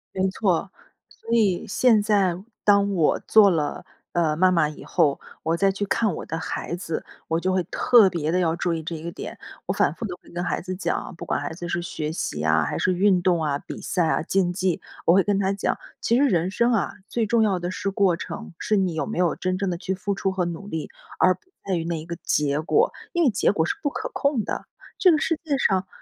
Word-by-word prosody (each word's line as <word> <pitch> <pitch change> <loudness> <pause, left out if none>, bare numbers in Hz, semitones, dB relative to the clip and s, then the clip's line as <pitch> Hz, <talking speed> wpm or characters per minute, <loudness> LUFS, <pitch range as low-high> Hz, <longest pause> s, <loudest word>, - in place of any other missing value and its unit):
没 190 0 +2
错。 190 -2 0 0.4
所 230 - -16
以 205 -6 +2
现 220 0 +4
在 200 -4 +2 0.3
当 200 -1 +4
我 165 -5 +2
做 210 -2 +6
了， 155 -4 -1 0.3
呃， 160 -3 +1
妈 185 +2 +4
妈 165 -4 +3
以 150 - -9
后， 155 -6 +1 0.2
我 165 +1 +1
再 195 +2 +3
去 200 +1 -3
看 210 -2 +1
我 - - -6
的 165 - -4
孩 170 - -4
子， 165 -3 -4 0.2
我 165 +1 +1
就 185 +1 0
会 185 -1 +1
特 210 +3 +5
别 160 -3 -2
地 180 - +2
要 165 -2 +1
注 175 0 -1
意 160 -1 -3
这 165 +1 -4
一 155 - -8
个 170 - -4
点。 - - -8 0.3
我 - - +1
反 - - +2
复 230 - -6
地 180 -3 -4
会 - - -19
跟 175 +1 -4
孩 - - -1
子 185 +1 -5
讲 185 - -1
啊， - - -8
不 - - -7
管 - - -1
孩 145 +2 -4
子 175 0 -6
是 175 0 -1
学 155 -3 -4
习 75 - -3
啊， 80 0 +3
还 75 - -2
是 185 - +1
运 185 0 +3
动 175 -2 +2
啊， 145 -2 0
比 - - -8
赛 180 -3 0
啊， - - +1
竞 180 0 +1
技。 185 -1 -1 0.2
我 170 - +6
会 195 -1 +5
跟 200 -1 +1
他 195 0 +1
讲， 195 - -1 0.2
其 235 - +2
实 285 - +4
人 180 -2 +1
生 235 +3 +2
啊， 220 - 0
最 230 -2 -1
重 230 +2 +2
要 195 -4 +2
的 175 +1 -3
是 195 - -2
过 190 -3 +2
程， 170 - -7
是 215 - +1
你 185 -4 +1
有 160 - -2
没 220 - -5
有 175 -2 +2
真 185 0 -1
正 195 -1 -1
地 175 - -2
去 190 +2 -3
付 200 +2 -2
出 195 -1 -1
和 190 -1 -1
努 175 +4 -5
力， 160 -5 -4 0.3
而 185 0 +5
不 - - -31 0.2
在 190 -2 0
于 165 -1 -2
那 165 -2 -2
一 - - -10
个 170 -1 -6
结 145 0 +1
果。 435 - +2 0.2
因 345 -1 +2
为 270 - +5
结 205 - +2
果 160 -3 +1
是 - - -1
不 285 - 0
可 - - -5
控 280 -6 0
的， - - -4 0.3
这 370 - +5
个 310 - +4
世 330 -3 0
界 290 -4 0
上 190 -6 +1
185 Hz, 270 characters per minute, -24 LUFS, 170-200 Hz, 0.4 s, 做